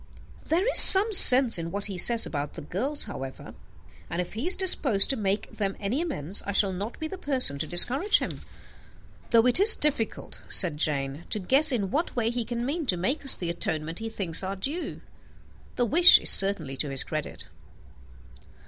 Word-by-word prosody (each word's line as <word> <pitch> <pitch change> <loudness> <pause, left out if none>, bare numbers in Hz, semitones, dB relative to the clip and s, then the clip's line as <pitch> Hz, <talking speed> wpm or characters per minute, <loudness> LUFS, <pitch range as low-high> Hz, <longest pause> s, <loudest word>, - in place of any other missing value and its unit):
"There 355 +7 -3
is - - +7
some 415 +3 +9
sense 255 - +6
in 165 0 -8
what 200 +3 -8
he 200 - -9
says 230 +6 +3
about 145 -1 -8
the - - -11
girls, 255 - -5
however; 135 -10 -11 0.6
and, 170 - -7
if 180 - -7
he 230 +10 -7
is 365 - +4
disposed 275 - +1
to - - -4
make 205 -3 -5
them 195 -2 -6
any 215 +9 -5
amends, 200 - -6
I 200 - -8
shall 195 -1 -1
not 205 +6 -9
be 315 - -7
the 375 +4 -12
person 255 - -2
to 155 - -6
discourage 265 - 0
him." - - -8 0.9
"Though 230 -1 +1
it 250 +6 0
is 425 +3 +6
difficult," 285 -7 -5
said 170 -6 +3
Jane, 145 0 -5
"to - - -4
guess 270 +11 +1
in 200 -7 -5
what 320 +4 -5
way 230 -2 -3
he 240 -1 -5
can 240 +1 -7
mean 300 +2 -6
to 180 - -1
make 260 - -5
us 270 - +6
the 175 -2 -6
atonement 160 -1 -6
he 225 0 -8
thinks 185 -7 -2
our 190 +1 -7
due, 285 - -8 0.7
the 245 - -2
wish 345 +9 +5
is - - +1
certainly 190 -9 +2
to 145 - -4
his 135 -1 -1
credit." 155 -1 -9
215 Hz, 195 wpm, -23 LUFS, 175-275 Hz, 0.9 s, some